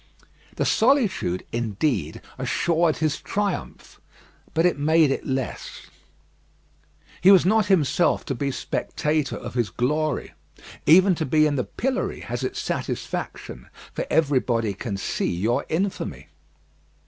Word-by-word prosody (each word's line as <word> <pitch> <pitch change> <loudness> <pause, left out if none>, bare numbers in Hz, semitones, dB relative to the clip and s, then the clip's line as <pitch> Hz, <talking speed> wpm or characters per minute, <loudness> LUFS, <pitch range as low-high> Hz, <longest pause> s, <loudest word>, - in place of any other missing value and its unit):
The - - 0
solitude, 220 - +2
indeed, 110 - -1 0.2
assured 170 -1 +1
his 155 -2 -1
triumph; 205 -2 -4 0.5
but 165 +2 +3
it 175 -5 +2
made 155 0 +4
it - - -3
less. 130 -2 -4 1.3
He 180 - +6
was 190 -4 +7
not 215 +1 +3
himself 175 -3 +2
to 140 - -2
be 140 +2 -2
spectator 150 +2 -2
of - - -7
his 120 -4 0
glory. 150 - -1 0.5
Even 185 +4 +7
to 165 - -2
be 155 +3 +4
in 150 -1 +1
the 125 - -1
pillory 260 +2 -2
has - - -4
its - - -3
satisfaction, - - -4 0.2
for - - -3
everybody 125 -8 +1
can 100 0 -5
see - - -2
your 110 +7 0
infamy. 190 +5 -3
155 Hz, 125 wpm, -24 LUFS, 125-180 Hz, 1.3 s, was